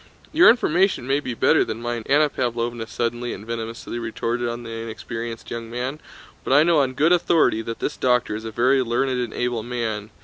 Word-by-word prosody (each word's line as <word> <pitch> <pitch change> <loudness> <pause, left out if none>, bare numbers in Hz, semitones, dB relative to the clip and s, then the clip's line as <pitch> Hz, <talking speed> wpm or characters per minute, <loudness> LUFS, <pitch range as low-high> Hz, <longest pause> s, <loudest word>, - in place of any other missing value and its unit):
"Your 335 +3 +8
information 190 - +2
may 135 +2 +1
be 125 -4 -5
better - - +4
than 110 0 -5
mine," 120 0 -3
Anna 150 +2 +4
Pávlovna 120 -3 -2
suddenly 120 0 -2
and 100 - -9
venomously 115 +1 -5
retorted 115 +1 -2
on 120 +1 -5
the 115 - -8
inexperienced 115 0 -6
young 115 -1 -5
man, 125 +5 -4 0.4
"but - - 0
I 145 +2 +7
know 165 -2 +4
on 130 -2 +1
good 155 +5 +3
authority 165 -9 +3
that 115 0 -5
this - - -3
doctor 125 -4 +1
is 110 - -6
a 110 - -5
very 130 +4 +2
learned 125 +2 0
and 120 -3 -3
able 120 -1 -2
man. 110 -3 -3
120 Hz, 200 wpm, -23 LUFS, 115-135 Hz, 0.4 s, Your